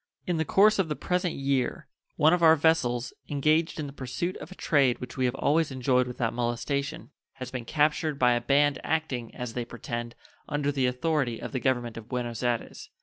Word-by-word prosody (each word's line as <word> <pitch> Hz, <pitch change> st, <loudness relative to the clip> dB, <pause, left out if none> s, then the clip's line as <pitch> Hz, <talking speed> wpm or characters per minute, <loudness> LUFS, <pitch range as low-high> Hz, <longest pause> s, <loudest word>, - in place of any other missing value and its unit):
In 175 Hz, -2 st, 0 dB
the 160 Hz, -, 0 dB
course 205 Hz, +6 st, +4 dB
of 180 Hz, -4 st, +1 dB
the 150 Hz, -, -1 dB
present 180 Hz, +1 st, -1 dB
year 135 Hz, -2 st, -1 dB, 0.3 s
one 155 Hz, +3 st, +5 dB
of 180 Hz, -, +2 dB
our 160 Hz, -1 st, +7 dB
vessels, 135 Hz, -6 st, +1 dB, 0.2 s
engaged 155 Hz, +3 st, +1 dB
in 150 Hz, -, -2 dB
the 140 Hz, -, -8 dB
pursuit 145 Hz, +8 st, -3 dB
of -, -, -10 dB
a -, -, -9 dB
trade 140 Hz, -9 st, +2 dB
which 125 Hz, -, -8 dB
we 130 Hz, -2 st, 0 dB
have 125 Hz, +1 st, 0 dB
always 155 Hz, +3 st, +2 dB
enjoyed 125 Hz, -1 st, +1 dB
without 120 Hz, -2 st, -2 dB
molestation, 140 Hz, +6 st, -2 dB, 0.2 s
has 130 Hz, -1 st, -8 dB
been 125 Hz, -3 st, -5 dB
captured 150 Hz, +1 st, +1 dB
by 125 Hz, -2 st, +4 dB
a 120 Hz, 0 st, +1 dB
band 140 Hz, +3 st, +3 dB
acting, 140 Hz, -7 st, -2 dB
as 125 Hz, -2 st, -5 dB
they 120 Hz, -, -2 dB
pretend, 120 Hz, 0 st, -6 dB, 0.3 s
under 145 Hz, -1 st, 0 dB
the 135 Hz, -3 st, +1 dB
authority 125 Hz, -2 st, 0 dB
of -, -, -6 dB
the 130 Hz, -, -2 dB
Government 120 Hz, -2 st, -1 dB
of 115 Hz, +1 st, -10 dB
Buenos 120 Hz, -3 st, -3 dB
Ayres. 120 Hz, -2 st, -2 dB
135 Hz, 205 wpm, -27 LUFS, 120-155 Hz, 0.3 s, our